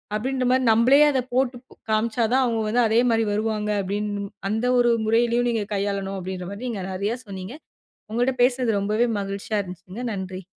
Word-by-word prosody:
அப்பிடீன்ற 255 +3 -1
மாரி. 260 0 +3
நம்பளே 240 +6 +5
அதை 260 -3 0
போட்டுக்காமிச்சா 240 -3 -1
தான், 265 0 +4
அவுங்க 230 -2 0
வந்து, 240 +3 +2
அதே 220 +1 +3
மாரி 225 0 +2
வருவாங்க. 210 0 -1
அப்பிடீன்னு 205 +1 -2
மு - - -8 0.2
அந்த 220 +4 -1
ஒரு 240 -1 +4 0.2
முறையிலயும் 235 +2 +2
நீங்க 220 -3 -1
கையாளனும். 195 -1 -2
அப்பிடீன்ற 185 -1 -5
மாரி, 200 +4 -7
நீங்க 215 -6 -4
நெறைய 200 +5 -2
சொன்னீங்க. 190 +4 -7 0.6
உங்கள்ட்ட 245 +3 +1
பேசினது 245 -4 +2
ரொம்பவே 215 +4 +1
மகிழ்ச்சியா 200 +2 -3
இருந்துச்சுங்க. 185 +4 -9
நன்றி. 190 -1 -6
220 Hz, 165 wpm, -24 LUFS, 200-245 Hz, 0.6 s, நம்பளே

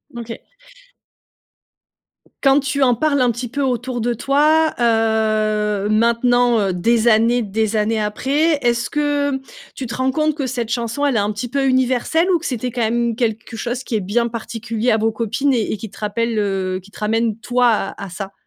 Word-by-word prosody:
OK. 230 -1 -7 2.0
Quand 270 0 +5
tu 280 0 0
en 250 -2 +4
parles 285 +3 +1
un 245 -1 +3
petit 240 +2 -5
peu 280 +4 -4
autour 250 -1 -1
de 240 +2 0
toi, 300 +6 +2
heu, 215 -3 +1
maintenant, 235 +2 +3
heu, 195 -3 0
des 225 +6 +1
années, 235 +2 +4
des 220 +1 -1
années 215 +1 +1
après, 285 +9 +1
est-ce 235 -1 0
que 290 -2 0 0.4
tu 265 - -5
te 235 - -5
rends 260 +1 0
compte 305 +1 0
que 285 -3 -3
cette 245 -3 -3
chanson 235 +4 -2
elle 280 -3 +1
est - - +3
un 205 +1 0
petit 210 +4 -4
peu 275 +2 -1
universelle 260 +6 +1
ou 350 - +3
que - - -10
c'était 250 -1 -2
quand 245 0 -4
même 235 +1 0
quelque 225 0 -2
chose 245 +3 -4
qui 230 - -3
est 215 - 0
bien 225 +5 0
particulier 230 0 -3
à 220 - +3
vos 220 0 0
copines 235 +5 0
et 230 -4 0
et - - -2
qui 215 +2 -8
te - - -17
rappelle, 225 +2 -2
heu, 190 -2 -1
qui 200 - -18
te - - -13
ramène 225 +1 0
toi 245 +1 +2
à 205 -3 -2
à 200 - -6
ça? 190 +2 -6
235 Hz, 200 wpm, -19 LUFS, 215-260 Hz, 2.0 s, Quand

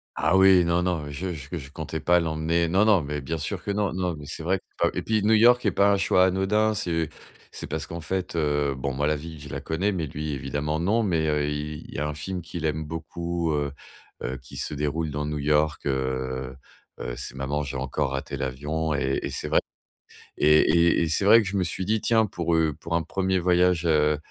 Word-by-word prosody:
Ah 95 - +2
oui! 95 -2 +7
Non, 85 +1 +1
non! 85 -5 -1
Je 90 +6 -4
je 75 +2 -6
je 70 -2 -9
comptais 80 +1 -5
pas 90 +2 +4
l'emmener 80 +1 0
non, 95 +5 +3
non 105 -5 +5
mais 75 0 -4
bien 80 +4 -4
sûr 90 +5 -4
que 100 - -2
non, 100 -3 0
non 90 -2 -1
mais 75 -1 -10
c'est 80 +2 -6
vrai 95 +2 +1
que - - -35
c'est - - 0
pas - - -16
et - - -1
puis 110 -2 0
New 110 +2 +4
York 120 +3 +5
est - - +3
pas 100 0 +4
un 100 - +3
choix 95 -1 +4
anodin, 100 +4 +2
c'est 80 -6 -1 0.4
c'est - - -7
parce 80 0 -4
qu'en 85 - -6
fait, 90 +1 -3
heu, 75 -3 +1
bon, 70 0 -2
moi 70 +2 0
la 75 - +2
ville 80 +1 -8
je 70 - -9
la - - -4
connais, 90 +6 -1
mais 90 -5 -2
lui 75 +1 -4
évidemment 75 +3 -2
non, 105 +7 +2
mais, 85 -7 +1
heu, 75 -1 +1
il 75 +1 -5
il - - -11
y - - -3
a 75 +1 -1
un 75 - -3
film 90 +4 -5
qu'il 85 -1 -5
aime 80 0 -1
beaucoup, 85 +1 -3
heu 75 -1 -1 0.5
heu, 65 +1 -3
qui 65 - -12
se - - -3
déroule 75 +2 -1
dans 75 0 -3
New 75 0 -3
York, 75 +2 +1
heu 65 -1 -2 0.4
heu, - - -4
c'est 65 - -5
Maman 70 +3 -2
j'ai 70 -1 -4
encore 65 0 -2
raté 70 0 -4
l'avion 75 +4 -2
et 70 -1 0
et - - -3
c'est - - -4
vrai - - +3 0.8
et 75 +1 +6
et 85 +1 +4
et 80 - -1
c'est 90 +5 +1
vrai 110 +2 +7
que - - -6
je 100 +2 -2
me 95 - +2
suis 90 +2 -3
dit: 110 +2 +1
«Tiens 110 -1 +3
pour, 85 -4 -1
heu, 80 -2 +2
pour 85 - -3
un 85 - +1
1er 95 +2 0
voyage, 90 -1 +2
heu, 75 -2 +3
80 Hz, 245 wpm, -25 LUFS, 75-90 Hz, 0.8 s, oui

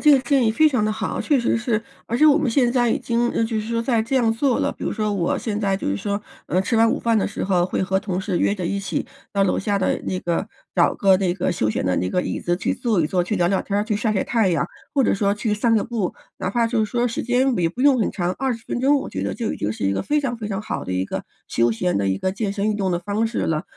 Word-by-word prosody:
这 300 - +6
个 275 - +7
建 270 -1 +2
议 220 - +3
非 310 +8 +4
常 250 -7 +1
得 215 - +1
好。 215 - -3
确 290 -4 +2
实 235 - +1
是， 230 -2 0 0.3
而 235 +2 -1
且 310 - +6
我 295 0 +6
们 290 -6 +1
现 245 0 +2
在 240 -3 +2
已 - - +1
经， 235 0 0
呃， 225 - 0
就 225 -1 -1
是 215 - -7
说 230 0 0
在 230 -2 +1
这 265 +4 -1
样 230 -3 +3
做 250 +2 +1
了， - - 0
比 - - -13
如 - - -1
说 215 -2 -1
我 175 -3 0
现 210 -2 -3
在 195 -1 +1
就 - - -5
是 100 +1 0
说， 200 - -2 0.3
呃， 185 - +1
吃 225 +4 0
完 225 0 +5
午 - - 0
饭 230 -1 +1
的 205 - +1
时 - - -4
候 180 -2 +2
会 - - -2
和 190 0 +1
同 190 -3 -2
事 190 -3 -1
约 - - +2
着 185 -4 -3
一 200 +2 -1
起 180 -5 -3 0.3
到 200 -1 +2
楼 190 - +1
下 200 0 0
的 190 - 0
那 185 - -2
个 175 +5 -2 0.3
找 - - +4
个 195 -2 +5
那 185 -3 +1
个 180 -1 -1
休 110 -9 0
闲 - - -2
的 90 - +2
那 90 - -1
个 180 - +1
椅 - - -3
子 175 0 0
去 - - -1
坐 225 -7 0
一 150 - +2
坐、 180 +2 +1
去 205 +4 -2
聊 175 - +2
聊 190 +1 +1
天 200 0 -1
儿、 205 - 0
去 215 - -1
晒 215 +1 0
晒 195 - 0
太 225 -5 +2
阳， 175 0 +1 0.3
或 275 -3 +3
者 - - +2
说 200 0 +1
去 210 0 -1
散 225 +1 +2
个 210 - +1
步。 220 -6 -2 0.3
哪 185 0 -2
怕 230 +2 +2
就 225 -2 +1
是 - - -7
说 245 0 +1
时 230 - -3
间 250 +2 +2
也 165 -1 +2
不 240 +9 -8
用 275 -4 +5
很 210 - +1
长， 180 -2 -1
20 250 -4 -2
分 245 - -2
钟， 285 +2 +4
我 - - -5
觉 - - -4
得 - - -2
就 230 -3 -2
已 - - -5
经 105 +1 -2
是 105 - -5
一 95 - +2
个 - - -1
非 295 +8 +1
常 245 -4 -2
非 215 -2 -5
常 200 +1 -2
好 - - -4
的 95 - -4
一 90 +1 0
个 - - -4 0.2
休 115 0 +2
闲 175 +11 0
的 100 -1 +1
一 95 - 0
个 185 - -1
健 200 0 -2
身 205 +1 -1
运 210 - 0
动 190 -2 0
的 175 - 0
方 205 +5 -1
式 230 - -3
了。 155 +1 0
210 Hz, 340 characters per minute, -22 LUFS, 185-235 Hz, 0.3 s, 个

